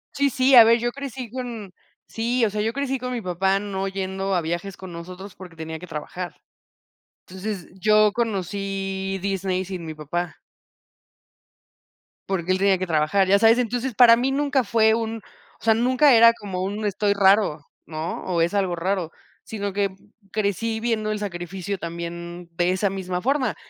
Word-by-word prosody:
Sí, 280 0 +2
sí, 260 +2 +2
a 235 - +11
ver, 230 +1 +5
yo 240 +1 -1
crecí 260 -3 -7
con 235 -7 -6 0.3
sí, 235 +1 0
o 205 - -1
sea, 210 - -2
yo 225 +2 0
crecí 270 0 -2
con 250 0 -4
mi 240 - -3
papá 190 +2 +1
no 195 -1 -3
yendo 195 0 -2
a 175 - +2
viajes 175 +4 -4
con 185 -2 -9
nosotros 180 +3 -9
porque 180 -3 -12
tenía 160 0 -6
que 180 - -10
trabajar. 170 +3 -6 0.9
Entonces, 190 0 -5
yo 215 +1 +4
conocí 195 -3 -3
Disney 190 -1 -1
sin 180 -3 -6
mi 160 - -6
papá 165 +4 -4 1.9
porque 185 -2 -1
él 185 - +3
tenía 195 0 +3
que 185 0 -3
trabajar, 160 +5 +2
ya 200 +1 +5
sabes. 225 +2 +6
Entonces 245 +1 -1
para 235 -2 +8
mí 255 +3 0
nunca 280 -1 +1
fue 220 0 +3
un 225 0 -2 0.4
o - - -21
sea, 225 - +6
nunca 255 +5 +4
era 230 0 +8
como 195 -5 -5
un 205 +3 -3
estoy 205 0 +1
raro, 195 -5 +3 0.2
¿no? 160 +1 -5
O 175 -3 0
es 170 +3 +1
algo 190 -3 0
raro, 175 -1 -2 0.3
sino 205 -2 -4
que 200 -1 -1 0.4
crecí 220 +2 -1
viendo 220 -2 -1
el 210 - -2
sacrificio 190 0 -4
también 170 0 -7
de 175 +1 +1
esa 190 +2 +1
misma 185 -2 -4
forma, 265 -2 0
195 Hz, 175 wpm, -23 LUFS, 180-225 Hz, 1.9 s, a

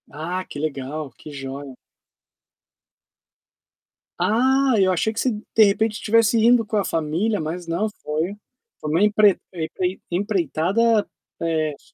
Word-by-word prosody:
Ah, 175 +5 -4
que - - -8
legal, 145 -1 -4
que 155 - -11
joia. 135 -1 -7 2.4
Ah, 260 +4 +3
eu 190 -2 +4
achei 200 +5 0
que 220 - -4
vocêm 220 -5 -1
de 220 - +8
repentem 215 +2 +2
tivesse 230 +1 +3
indo 230 +1 +4
com 215 - -2
a 200 - +1
família, 165 +7 0
mas 170 +3 -4
não, 170 +6 0 0.2
foi 160 +6 -2 0.4
foi 150 - -4
uma 165 +6 +2
empre 210 -2 +5 0.2
em 160 -3 -4 0.4
em 175 - +1
empreitada, 205 +3 +1 0.3
eh, 160 -2 0
s - - -20
185 Hz, 140 wpm, -22 LUFS, 155-215 Hz, 2.4 s, de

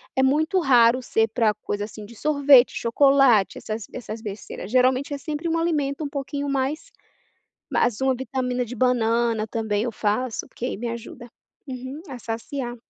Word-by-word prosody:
é 265 - +3
muito 315 +8 +2
raro 250 -5 +5
ser 225 -3 +1
para 220 -1 +2
coisa, 205 -1 -4
assim, 210 0 -10
de 235 - -14
sorvete, 285 -1 +5
chocolate, 255 -3 +4
essas 215 -1 -5
b - - -9
essas 220 -1 -7
besteiras, 205 -2 -7
geralmente 255 +3 +2
é 285 - -2
sempre 305 +3 -4
um 330 - +1
alimento 300 -3 -1
um 290 - -3
pouquinho 280 0 -4
mais 275 - -2 0.8
ma - - +1 0.2
uma 265 -1 +2
vitamina 250 -1 -2
de 240 - -8
banana 230 -2 +1
também, 220 -2 -1
eu 240 - -2
faço, 220 +3 -2
porque - - -12
aí 250 - -3
me 235 +3 -4
ajuda 235 +1 -8 0.4
uhum, 260 +3 -7
a 260 - -6
saciar. 240 +2 -5
250 Hz, 170 wpm, -24 LUFS, 225-275 Hz, 0.8 s, raro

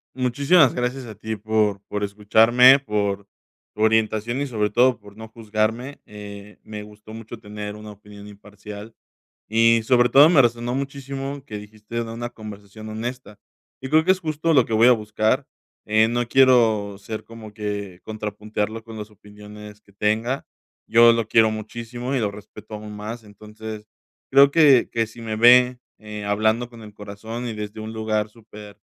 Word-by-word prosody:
Muchísimas 140 +4 +3
gracias 125 +1 -3
a 110 -2 -10
ti 110 +1 -5
por 105 -1 0
por 105 0 -4
escucharme, 115 +6 +5
por 100 -5 -2 0.5
tu 105 - -7
orientación 110 +3 +1
y 145 - -2
sobre 105 -4 -1
todo 125 +2 +3
por 100 -1 -16
no 110 +1 -10
juzgarme, 110 +4 -3
eh, 105 0 -11
me 105 -1 -8
gustó 105 +1 -14
mucho 115 +1 -9
tener 105 0 -7
una 105 0 -10
opinión 105 0 -14
imparcial, 105 +1 -11 0.5
y 115 +1 +3
sobre 120 +1 +3
todo, 140 +6 +7
me 165 -6 +5
resonó 120 0 +1
muchísimo, 140 0 -5
que 110 -7 -7
dijiste 105 +2 -11
de 115 - -7
una 120 +1 -5
conversación 110 -1 -11
honesta, 110 0 -7 0.4
y 130 - -6
creo 155 +1 +5
que, 185 +3 +4
es 190 - -4
justo 160 0 -1
lo 130 -4 +5
que 115 - -8
voy 110 +2 +5
a - - +8
buscar, 110 +4 0 0.4
eh, 110 +1 +3
no 120 +1 -1
quiero 115 -6 +3
ser 110 +2 -7
como 115 -2 -12
que 100 -3 -5
contrapuntearlo 105 0 -5
con 110 0 -11
las 105 0 -8
opiniones 105 0 -13
que 100 - -24
tenga, 110 +6 -1 0.4
yo 115 0 +6
lo 115 -2 -1
quiero 110 -1 +4
muchísimo 120 +4 -6
y - - +1
lo 105 -2 -1
respeto 105 +1 -13
aún 105 0 -9
más, 110 +2 -7
entonces 105 +1 -10 0.4
creo 140 +1 +6
que 140 -5 +5
que 115 -1 0
si 110 +2 -14
me 110 -1 -4
ve, 125 +2 +6 0.2
eh, 105 -1 -8
hablando 110 +4 0
con 115 -1 -14
el 105 -1 -12
corazón 110 +4 -7
y 115 - -4
desde 105 0 -7
un 110 +1 -7
lugar 110 -1 -2
súper 105 -2 -14
110 Hz, 175 wpm, -22 LUFS, 105-120 Hz, 0.5 s, a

